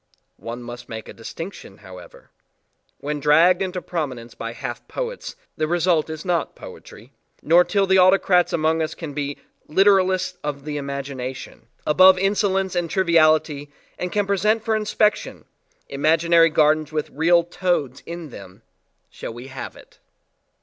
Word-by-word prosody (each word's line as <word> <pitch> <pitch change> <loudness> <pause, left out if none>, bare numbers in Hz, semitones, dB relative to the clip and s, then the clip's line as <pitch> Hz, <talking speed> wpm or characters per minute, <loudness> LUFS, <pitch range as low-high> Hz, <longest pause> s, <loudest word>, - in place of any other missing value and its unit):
One 120 +1 -7
must 120 0 -9
make 110 -1 -7
a - - -9
distinction 115 - -9
however: 95 -3 -14 0.7
when 150 +1 -4
dragged 165 +5 +4
into 185 -1 -3
prominence 130 -9 -5
by 115 0 -6
half - - -7
poets, - - -5 0.2
the 155 - 0
result 170 -2 +1
is 155 +1 -7
not 175 -2 -1
poetry, 115 +5 -13 0.3
nor 170 +3 +5
till 200 +1 +1
the 190 0 +4
autocrats 185 -1 +4
among 160 0 +1
us 160 0 -3
can 160 -4 -7
be 145 0 -4 0.3
"literalists 190 +1 +3
of 145 -1 -5
the 150 -1 -4
imagination" 135 -4 -6 0.2
above 185 +4 +6
insolence 195 -1 0
and 175 -1 -1
triviality 155 -5 +2 0.3
and 180 - -3
can 205 +1 0
present 210 +3 +1
for 220 - +1
inspection, 215 0 0 0.4
imaginary 165 +3 +3
gardens 155 0 +2
with 155 -1 -3
real 170 +3 +3
toads 175 -7 -2
in 170 -3 -7
them, 100 0 -12 0.5
shall 115 - -8
we 125 +3 -10
have 130 - -7
it. - - -18
160 Hz, 145 wpm, -22 LUFS, 140-185 Hz, 0.7 s, above